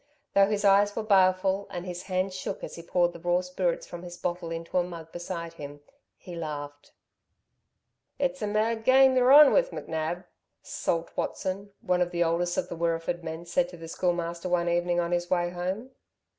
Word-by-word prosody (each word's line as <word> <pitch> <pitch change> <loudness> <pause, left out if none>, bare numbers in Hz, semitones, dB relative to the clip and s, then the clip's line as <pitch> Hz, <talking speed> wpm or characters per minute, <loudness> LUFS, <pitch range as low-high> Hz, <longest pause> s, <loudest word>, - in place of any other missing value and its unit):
Though 195 0 +5
his 210 0 -1
eyes 200 +1 +5
were 225 - -2
baleful, 190 -1 +3
and 175 0 -6
his 180 -1 -5
hands 185 +1 0
shook 185 - -5
as - - -6
he 170 - -8
poured 175 +1 +1
the 170 - -10
raw 175 +1 +1
spirits 180 -1 -2
from 175 - -8
his 175 -1 -9
bottle 175 -1 -3
into 165 +2 -2
a - - +2
mug 165 -2 -9
beside 170 -1 -5
him, 145 -2 -9 0.4
he 180 - -11
laughed. 145 -3 -6 1.3
"It's 275 -1 -1
a 210 - -1
mad 220 +2 0
game 265 +1 +6
y're 255 0 +5
on 295 0 +9
with - - +3
McNab," 160 - -4 0.4
Salt 165 0 -2
Watson, 195 +2 -3
one 180 0 +1
of 175 - +2
the 175 0 +1
oldest 175 +1 0
of - - 0
the - - -6
Wirreeford 170 +1 -1
men, 160 +1 -6
said 175 +1 +1
to 180 - -11
the 165 0 -9
Schoolmaster 175 0 -2
one 175 -1 +1
evening 175 0 +1
on 170 0 -1
his 175 0 -1
way 175 -1 +1
home. 185 +8 -4
175 Hz, 195 wpm, -27 LUFS, 170-195 Hz, 1.3 s, on